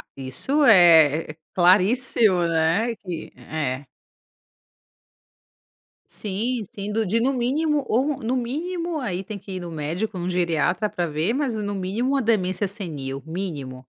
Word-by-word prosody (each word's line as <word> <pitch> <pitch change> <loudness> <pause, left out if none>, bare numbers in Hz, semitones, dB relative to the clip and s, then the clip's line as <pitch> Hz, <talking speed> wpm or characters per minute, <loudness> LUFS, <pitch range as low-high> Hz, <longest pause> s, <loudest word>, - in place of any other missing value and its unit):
Isso 135 - -1
é 165 -7 +6
é - - -14 0.2
claríssimo, 190 +1 +3
né, 165 +8 +1
que 175 -5 -7
é. 145 -3 -4 2.2
Sim, 220 +4 -2
sim 200 +1 -5
do 220 +1 0
de 215 +4 +1
no 265 +3 +2
mínimo 285 +4 0
ou 265 +5 +1
no 235 +3 -1
mínimo 330 +7 -3
aí 195 -8 -3
tem 205 +1 -7
que 195 0 -9
ir 185 - -4
no 175 -1 -7
médico, 170 +7 -3
no 175 +1 -2
geriatra 175 +3 0
para 180 -4 -2
ver, 160 +8 -1
mas 270 -5 -1
no 205 -1 -3
mínimo 220 +9 -1
a 270 - +1
demência 200 -3 +1
senil 150 -9 -5
mínimo. 160 -7 -5
195 Hz, 145 wpm, -23 LUFS, 165-235 Hz, 2.2 s, é